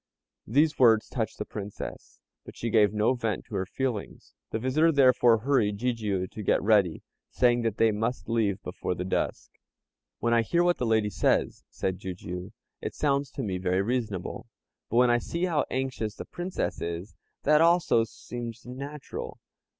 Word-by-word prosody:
These 145 +6 +2
words 115 -4 +5
touched 110 -3 -3
the - - -4
Princess, 100 -1 -7 0.2
but - - -12
she 115 - -3
gave 105 -3 +5
no 110 +4 +2
vent 115 -5 -2
to - - -14
her 95 -2 -1
feelings. 125 -3 -4 0.2
The - - -2
visitor, 135 +8 +3
therefore, 125 -5 +5
hurried 115 -6 +2
Jijiu 105 -5 -1
to 105 - -8
get 100 - +2
ready, 100 -5 +3 0.3
saying 120 -1 +3
that 115 -3 -1
they 115 -1 +4
must 115 +4 -2
leave 110 -4 +1
before 90 0 -3
the 90 - -4
dusk. 95 - -2 0.7
"When 115 +1 +1
I 115 - +5
hear 170 +10 +2
what 175 0 +2
the 125 - 0
lady 110 -2 +2
says," - - +1
said 95 -1 -3
Jijiu, 90 +1 -6 0.3
"it - - -5
sounds 140 -2 +1
to 135 - -4
me 95 -4 -2
very 95 +1 +1
reasonable; 110 -5 -3 0.4
but - - -3
when 125 0 +6
I 120 - +3
see 170 +8 -2
how 165 -4 +1
anxious 130 -5 -2
the - - -7
Princess 175 +1 -4
is, 85 +4 -4 0.3
that 150 +1 +5
also 165 -8 +4
seems 115 +1 -7
natural. 140 +4 -7
115 Hz, 175 wpm, -28 LUFS, 105-130 Hz, 0.7 s, when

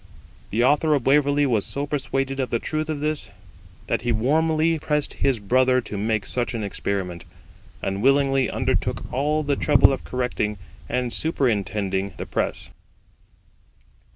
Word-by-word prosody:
The 115 +3 +1
Author 150 +3 +3
of 135 - -2
Waverley 145 +1 +3
was 115 -7 +1
so 140 +1 -3
persuaded 135 -2 -2
of 130 -2 -1
the 115 - +1
truth 155 +5 -3
of 150 -2 -3
this, 150 -6 -2 0.6
that - - -1
he 120 +1 -1
warmly 155 +7 +2
pressed 150 -1 -1
his 135 -3 +1
brother 130 +5 +3
to 110 - -7
make 105 0 -1
such 120 -1 -2
an 110 - -3
experiment, 95 -3 -3 0.6
and 95 +1 -2
willingly 135 0 +3
undertook - - -1
all 150 +4 +1
the 140 -1 +1
trouble 145 -2 +5
of 135 - -5
correcting 125 -4 -2 0.3
and 125 -1 -1
superintending 100 - 0
the - - -5
press. - - -3
130 Hz, 150 wpm, -23 LUFS, 110-145 Hz, 0.6 s, trouble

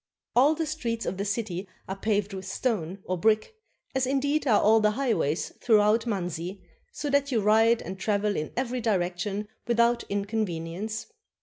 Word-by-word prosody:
All 280 +6 +5
the 325 +1 -1
streets 240 -7 -3
of 185 - -3
the 200 - -2
city 200 -3 -2 0.2
are 190 - -3
paved 205 0 0
with 190 0 -6
stone 195 -4 -2
or 185 -1 -2
brick, 215 - +2 0.4
as 265 -1 +1
indeed 285 +3 +1
are 215 -4 +5
all 220 +1 +5
the 215 0 +3
highways 190 - 0
throughout 220 0 +4
Manzi, 180 -2 -3 0.3
so 295 - -5
that 280 0 +2
you 235 - +2
ride 225 +2 +4
and 190 +1 -7
travel 205 0 0
in 155 - -3
every 250 -1 -1
direction 200 0 -1 0.2
without 235 0 +3
inconvenience. 200 0 -3
215 Hz, 165 wpm, -27 LUFS, 195-235 Hz, 0.4 s, All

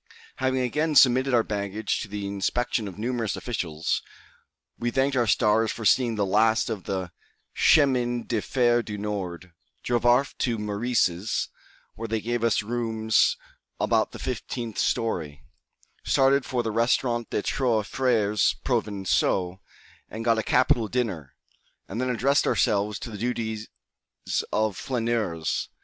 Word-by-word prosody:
Having 130 0 0
again 150 +5 0
submitted 130 0 +5
our 120 -2 +4
baggage 105 0 -2
to - - -5
the 100 0 -5
inspection 105 +3 -1
of 95 - -9
numerous 115 -2 -2
officials, 85 -8 -2 0.8
we 120 - 0
thanked 135 +3 +1
our 120 -3 +2
stars 110 +2 +3
for 115 - -6
seeing 120 0 +3
the 105 -1 0
last 110 +4 +2
of 105 -5 -5
the 95 -3 -3 0.4
Chemin 125 -5 +3
de 115 -3 -1
Fer 120 -1 +2
du 105 -3 -6
Nord, 95 -4 -5 0.3
drove 120 -1 0
off 125 +3 +3
to 120 -3 0
Meurice's, 105 -2 0 0.4
where 115 - -6
they 110 0 -1
gave 120 +2 -2
us 115 -2 +2
rooms 110 -1 +1 0.4
about - - +1
the - - -9
fifteenth 115 -3 -4
story, 80 -11 -1 0.6
started 135 0 +3
for 125 -2 -1
the 110 - -2
Restaurant 120 +1 +1
des 105 - -2
Trois 120 -5 +1
Frères 110 -4 +1
Provençaux, 95 -2 0 0.5
and 115 +1 -6
got 115 -1 +3
a - - +2
capital 125 -1 +2
dinner, 100 - -3 0.5
and 110 +6 -4
then 130 - -1
addressed 135 +4 +2
ourselves 105 0 +1
to 120 - -7
the 105 - -7
duties 110 -2 -3 0.8
of 110 -2 0
flaneurs. 115 - -2
115 Hz, 140 wpm, -26 LUFS, 105-120 Hz, 0.8 s, submitted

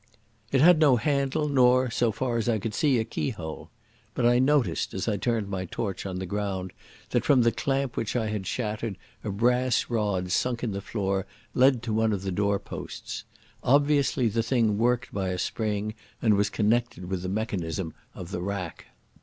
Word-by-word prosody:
It 135 - +3
had 175 +1 +7
no 145 -5 +6
handle 140 +3 0
nor, 130 -2 +4
so 120 -1 +2
far 120 +1 -1
as 115 0 0
I 115 - +2
could 105 +1 -4
see, 140 +2 +2
a 115 - +1
keyhole.... 85 - -5 0.5
But 125 - +1
I 120 +1 +5
noticed, 140 0 +1
as 95 - -2
I 110 - +1
turned 115 -1 0
my 95 -2 -3
torch 100 +2 -4
on 95 -1 -4
the 95 - -3
ground, 95 -1 -3 0.4
that - - +2
from 130 -4 +4
the 115 - +4
clamp 135 -1 -1
which 115 - -2
I 115 -3 +1
had 105 -3 -3
shattered 110 -3 -3 0.3
a 110 - -3
brass 125 +5 +1
rod 100 -5 0
sunk 120 +5 0
in 115 - 0
the 100 0 -4
floor 95 -2 -2 0.3
led 130 -2 +4
to 115 -2 -2
one 110 0 +2
of 95 -2 -3
the 95 - -2
door 100 +2 +1
posts. - - -7 0.4
Obviously 140 -1 +3
the 115 +1 +1
thing 115 -3 +1
worked 120 +1 +1
by 95 -1 -1
a 90 - -2
spring 105 +2 -2 0.3
and 110 -3 +3
was 100 0 +2
connected 115 -2 0
with 90 0 -3
the 90 - -3
mechanism 95 -5 -2 0.2
of 90 0 -8
the 90 - -3
rack. 95 -3 -4
110 Hz, 195 wpm, -27 LUFS, 100-125 Hz, 0.5 s, had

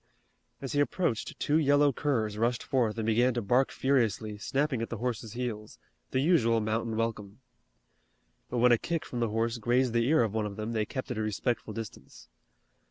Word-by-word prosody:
As 135 - -4
he 145 - +1
approached 145 - -1
two 150 +2 +2
yellow 145 -1 +4
curs 115 -7 -1
rushed 115 +2 0
forth 115 -5 0
and 110 - -2
began 120 +3 +3
to 120 - 0
bark 125 +6 +3
furiously, 115 -5 0
snapping 135 +1 -1
at 115 - -3
the 120 - -4
horse's 115 -2 -3
heels, 115 -4 -5 0.3
the 130 - 0
usual 135 -8 +3
mountain 110 +1 -1
welcome. 110 -2 -3 1.1
But 125 - -3
when 125 +1 +5
a 120 - +5
kick 165 -2 -2
from 120 - -5
the 115 -2 +1
horse 115 +2 -1
grazed 120 +2 +1
the 115 0 +2
ear 155 -3 +4
of 110 -3 -2
one 110 -1 0
of 100 - -7
them 110 +2 -4
they 110 -2 -1
kept 130 +2 -5
at 115 - -3
a - - 0
respectful 110 +2 -2
distance. 110 0 -9
115 Hz, 195 wpm, -29 LUFS, 110-130 Hz, 1.1 s, when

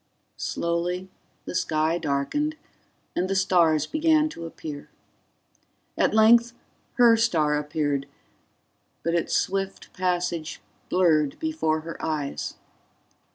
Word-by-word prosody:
Slowly 175 +2 -2 0.4
the - - -6
sky 160 0 +1
darkened 160 - -1 0.6
and 185 +1 0
the 195 - 0
stars 170 -5 +3
began 310 - +2
to 165 - -7
appear. 150 -3 -8 1.1
At - - +2
length 230 +2 +6 0.4
her 235 -2 +6
star 165 -10 +2
appeared, 145 -2 -2 1.0
but 165 - 0
its 170 - 0
swift 195 0 -2
passage 175 -3 -2 0.3
blurred 155 -6 +2
before 310 - -1
her 165 +1 -8
eyes. 150 -3 -3
170 Hz, 105 wpm, -25 LUFS, 155-195 Hz, 1.1 s, length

